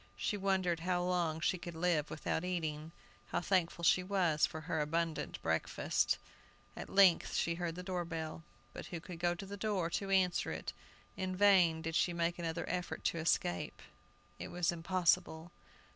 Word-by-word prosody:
She - - -1
wondered 190 -4 +1
how 175 +1 0
long 175 -3 0
she 180 +2 +1
could 170 -1 -7
live 165 -3 +1
without 160 +1 -2
eating. 160 -3 -3 0.4
How - - -1
thankful 175 -2 0
she 180 - +5
was 180 -5 +2
for 160 - -7
her 160 0 -2
abundant 165 +1 -2
breakfast! - - +1 0.6
At - - -7
length 190 -3 +5
she 170 - +1
heard 170 -1 -3
the 180 - -6
door 180 -1 -2
bell. 165 -2 -5 0.3
But - - -7
who 175 - -5
could 170 0 -9
go 175 0 +1
to 185 - -7
the 200 +1 -7
door 195 -5 -1
to 195 +2 -2
answer 185 -2 +2
it? - - -5 0.4
In 185 -1 -3
vain 180 -5 +5
did 165 -1 -3
she 175 - +2
make 170 0 -1
another 170 0 -3
effort 180 0 -3
to 165 - 0
escape; 90 - 0 0.6
it - - -5
was 175 -1 0
impossible! 170 -1 +1
175 Hz, 175 wpm, -34 LUFS, 165-185 Hz, 0.6 s, she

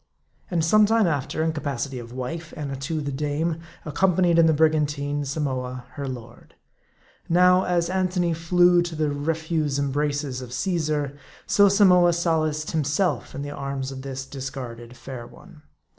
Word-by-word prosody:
And 170 -3 +1
some 210 +5 +5
time 225 0 +3
after, 155 -1 -1
in 160 0 0
capacity 140 -3 -3
of 115 -1 -10
wife, 130 +6 -6
Annatoo 140 +1 -3
the 140 -1 -3
dame, 150 +4 -1 0.3
ac 150 - -5
companied 180 -1 +3
in 165 - +6
the - - +5
brigantine, 145 -2 +1
Samoa 130 -3 -3
her 140 -1 -5
lord. 120 -2 -9 0.7
Now, 180 +2 +5
as 175 -1 +1
Antony 180 -2 0
flew 175 +2 +4
to 170 -1 -4
the 155 -1 0
refuse 155 0 -1
embraces 145 -1 -1
of 125 -1 -8
Caesar, 150 -1 -1 0.3
so 200 -1 +5
Samoa 180 -3 +5
solaced 155 -3 0
himself 150 - 0
in 140 - -4
the 145 - -5
arms 140 -1 -4
of 130 -1 -7
this 135 -1 -5
discarded 125 -3 -7
fair 125 -3 -8
one. 150 - -16
150 Hz, 155 wpm, -24 LUFS, 135-170 Hz, 0.7 s, in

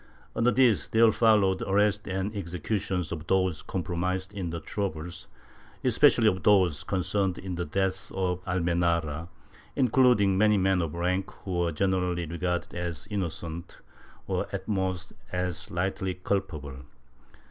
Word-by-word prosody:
Under 115 +1 +3
this 115 - +3
there 110 0 +5
followed 105 -5 +3
arrests 105 +1 +1
and 95 +3 -2
executions 90 -1 -2
of 80 -1 -5
those 95 -4 +1
compromised 95 +1 -3
in 95 -4 -3
the 85 0 -4
troubles, 85 0 -4 0.6
especially 115 -2 +5
of 95 -3 +2
those 95 -7 +3
concerned 95 0 0
in 95 -1 -5
the 85 0 -2
death 95 +4 -2
of 90 -1 -1
Almenara, 85 -3 0 0.5
including 125 -7 +4
many 105 0 +5
men 95 -1 +2
of 80 -1 -3
rank, 90 +3 0
who 90 -3 -2
were 85 -1 +1
generally 90 +1 0
regarded 90 +2 -3
as 85 -1 -4
innocent, 85 -3 -4 0.5
or - - -1
at - - -5
most 95 -3 -2 0.2
as 90 -3 -2
lightly 95 +1 -2
culpable. 85 -8 -3
95 Hz, 135 wpm, -28 LUFS, 85-100 Hz, 0.6 s, there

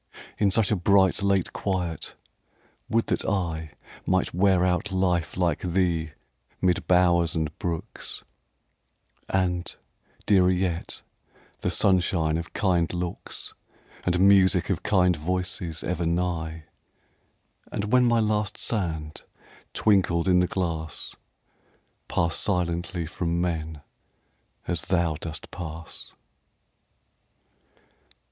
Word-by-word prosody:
In 105 - +4
such 105 +1 +1
a - - +4
bright, 95 +1 +3
late 100 -2 +1
quiet, 90 -4 -3 0.7
would 115 0 +2
that - - -1
I 80 -6 -2 0.3
Might 95 0 +1
wear 90 0 +3
out 90 +2 0
life 90 -3 0
like 90 -2 +1
thee, 85 -3 0 0.5
mid 90 -2 +1
bowers 85 -2 +4
and 80 -2 -2
brooks, 85 -2 -5 1.1
And, 90 -2 0 0.5
dearer 95 -3 +5
yet, 90 -2 -1 0.6
the - - -1
sunshine 85 -4 +2
of 85 - -7
kind 90 -5 +1
looks, 90 -1 -5 0.5
And 90 0 +1
music 95 -2 +5
of - - -1
kind 90 -3 +3
voices 90 0 -3
ever 85 -1 -1
nigh; 85 -2 -1 1.1
And 105 +1 -3
when 125 -1 +6
my 120 -1 +4
last 105 -1 0
sand 80 -8 -3 0.5
twinkled 95 -5 +2
in 90 -1 +5
the 90 - +3
glass, 80 -5 -3 0.9
Pass 85 -1 0
silently 85 -2 -1
from 85 +1 -2
men, 80 -3 -2 0.9
as 85 -2 -1
thou 85 -2 +1
dost 80 0 -7
pass. 80 -1 -7
90 Hz, 110 wpm, -26 LUFS, 85-95 Hz, 1.1 s, when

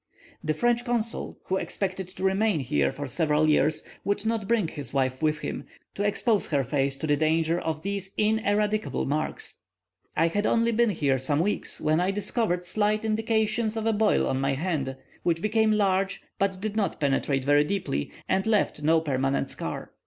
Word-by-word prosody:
The 155 0 0
French 240 +6 +2
consul, 235 -2 -1
who 190 - -1
expected 190 -1 -3
to 185 - -8
remain 195 -1 +2
here 70 - +1
for 145 - -6
several 150 +2 +1
years, 155 0 +2 0.2
would 200 +1 -1
not 220 -3 -1
bring 220 -6 +2
his 145 -3 -7
wife 130 -1 0
with 155 -1 +2
him, - - -5 0.3
to - - -5
expose 205 +1 +1
her 140 -3 +1
face 135 +1 0
to - - -4
the 145 -1 +3
danger 160 +2 +1
of 155 -2 -3
these 200 -1 -3
ineradicable 215 0 +1
marks. 150 +3 -3 0.6
I 165 - +4
had 205 +4 0
only 230 0 +2
been 235 0 +3
here 140 -8 +1
some 145 +3 0
weeks, 200 +5 -1
when 155 +1 +2
I 180 - +1
discovered 195 -2 -1
slight 215 +3 0
indications 220 0 0
of 220 - -2
a 225 - +2
boil 215 0 +3
on 130 0 -1
my 135 0 +1
hand, 140 -4 -2 0.3
which 165 -1 +1
became 220 +3 +2
large, 195 -2 +1 0.2
but 195 -1 0
did 215 +1 -3
not 210 -3 -1
penetrate 135 -2 0
very 145 +1 +5
deep, 195 +4 -2 0.4
and 190 +2 +1
left 210 -8 +1
no 160 +2 +3
permanent 135 -2 0
scar. - - -6
185 Hz, 180 wpm, -26 LUFS, 150-215 Hz, 0.6 s, very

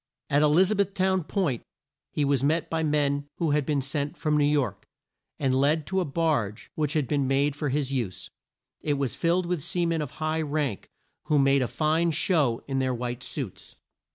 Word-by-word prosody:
At 145 +1 +4
E - - +5
liz 175 +7 +4
a - - +2
beth 200 -1 0
town 190 -3 +1
Point 165 - -1 0.5
he 150 - 0
was 140 -2 +1
met 160 +4 +1
by 165 0 0
men 145 -2 +1
who 165 -3 +1
had 145 -2 +1
been 145 -3 +1
sent 145 +4 -2
from 150 -2 0
New 150 - +3
York, 145 -2 0 0.5
and 135 -3 +1
led 145 +4 +2
to 190 +3 0
a 180 - 0
barge 140 -9 -1
which 150 -2 -1
had 150 -5 0
been 140 -1 +1
made 140 +2 +2
for 150 -1 -2
his 140 0 -1
use. 115 -9 -3 0.5
It 145 - 0
was 140 -3 -1
filled 175 +2 +1
with 175 -2 -1
sea 175 +4 -1
men 165 -1 0
of 150 - -3
high 155 0 -1
rank, 145 -7 -2 0.4
who 150 - +2
made 135 0 +4
a 125 - +1
fine 160 +4 +1
show 150 -7 +1
in 135 -1 -1
their 130 -1 0
white 120 +1 -4
suits. 130 -7 -7
150 Hz, 210 wpm, -27 LUFS, 135-160 Hz, 0.5 s, E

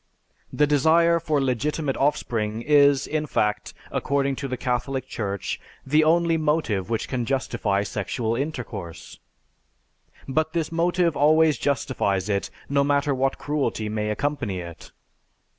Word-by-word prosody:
The 150 - +3
desire 160 +4 +4
for 155 -3 0
legitimate 135 +2 -1
offspring 115 -6 -1
is, 140 -1 +4
in 155 0 -2
fact, 105 -6 -1 0.2
according 140 0 0
to 140 - -4
the 130 -1 -3
Catholic 130 +1 -2
Church, 100 -6 -4 0.2
the 150 +3 +3
only 165 +1 +3
motive 150 - 0
which 115 -1 -1
can 125 -2 -2
justify 115 -6 -1
sexual 110 +3 -2
intercourse. 115 - -6 1.1
But 155 +4 0
this 165 -2 -1
motive 170 0 +1
always 155 +1 +4
justifies 105 -8 0
it, 100 -1 -1 0.2
no 140 0 +2
matter 140 0 +1
what 135 +1 0
cruelty 145 -7 -2
may 105 0 -2
accompany 125 -5 -2
it. 85 -2 -10
140 Hz, 130 wpm, -24 LUFS, 110-150 Hz, 1.1 s, desire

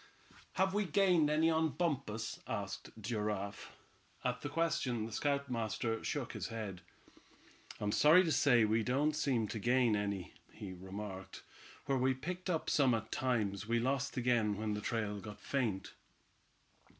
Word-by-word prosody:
"Have 190 0 +2
we 205 0 +1
gained 180 -3 +4
any 160 +2 +3
on 160 -1 +1
Bumpus?" 135 -9 -2
asked - - -4
Giraffe. 105 -2 -3 0.5
At 125 0 -1
this 145 - -4
question 150 -8 0
the 115 - -7
scoutmaster 115 -4 -1
shook - - -2
his - - -4
head. 105 -5 -5 1.0
"I'm 105 0 0
sorry 160 - +7
to 165 - 0
say 130 -5 +5
we 110 +2 +2
don't 140 +6 +1
seem 130 -7 +1
to 110 - -3
gain 120 0 +3
any," 100 -3 -2 0.2
he 95 -3 -7
remarked. 95 +1 -7 0.4
"Where 135 -1 +1
we 130 +1 +2
picked 180 +7 -5
up 165 -3 0
some 130 -5 +4
at 110 - -5
times, 105 -6 0
we 120 +1 +2
lost 135 +3 -1
again 120 -4 +2
when 110 0 -1
the 105 - -3
trail 105 -2 -2
got 105 0 -9
faint." 115 -9 -2
120 Hz, 150 wpm, -35 LUFS, 105-145 Hz, 1.0 s, sorry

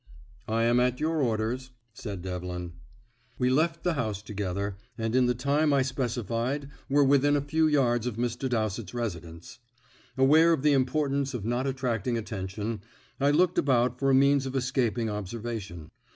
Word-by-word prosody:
"I 115 +1 +1
am 120 +1 +3
at 125 0 +1
your 160 0 0
orders," 120 +2 -1 0.2
said 100 -6 -7
Devlin. 90 -2 -5 0.6
We 125 0 +1
left 165 +4 +1
the 175 - +1
house 110 -8 -3
together, 100 -1 -3 0.2
and 115 -1 -2
in 130 -1 +4
the 125 - +1
time 145 +4 +1
I 135 -1 +3
specified 125 +2 -2 0.2
were 145 +1 +4
within 140 +1 +4
a - - +3
few 155 +3 +1
yards 125 -5 +2
of 120 - -3
Mr. 120 +2 -2
Dowsett's 110 -3 -2
residence. 85 -8 -6 0.6
Aware 155 +5 +5
of 145 - -1
the 150 -1 +4
importance 140 0 0
of 110 -4 -5
not 120 +3 -1
attracting 125 -3 -1
attention, 105 0 -4 0.4
I 140 +1 +3
looked 175 +4 +3
about 125 -2 +2
for 135 - +2
a 135 - +5
means 140 0 +4
of 130 - -5
escaping 125 -3 0
observation. 105 -4 -5
125 Hz, 165 wpm, -28 LUFS, 110-140 Hz, 0.6 s, Aware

